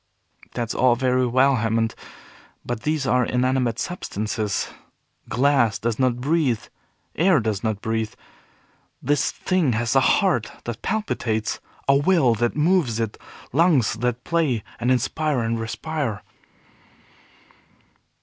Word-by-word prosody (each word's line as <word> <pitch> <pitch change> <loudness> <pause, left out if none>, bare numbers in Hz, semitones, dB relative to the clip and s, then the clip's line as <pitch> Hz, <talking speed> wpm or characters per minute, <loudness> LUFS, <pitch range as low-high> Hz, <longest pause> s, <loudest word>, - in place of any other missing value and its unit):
"That's 120 -2 -2
all 125 -1 +3
very 130 0 +1
well, 130 +2 +3
Hammond, 115 0 0 0.7
but 120 -2 -3
these 150 -1 -1
are 125 -1 +3
inanimate 125 -1 0
substances. 110 - -3 0.6
Glass 125 -2 +2
does 115 -1 -2
not 125 -2 +1
breathe, 140 -4 +1 0.5
air 170 -1 +4
does 110 -3 -2
not 110 -2 -1
breathe. 110 -1 -2 0.8
This 145 0 +1
thing 180 -9 0
has 115 +3 0
a - - +7
heart 130 - +2
that 120 -2 -6
palpitates, 115 - -2 0.3
a 140 - +5
will 145 -4 +3
that 120 +2 0
moves 150 -7 +2
it, 115 -2 -3 0.3
lungs 150 - +3
that 120 +2 -2
play, 155 -10 0 0.2
and 120 +2 0
inspire 135 +2 +1
and 115 0 -1
respire." 115 +1 -3
125 Hz, 120 wpm, -23 LUFS, 115-145 Hz, 0.8 s, a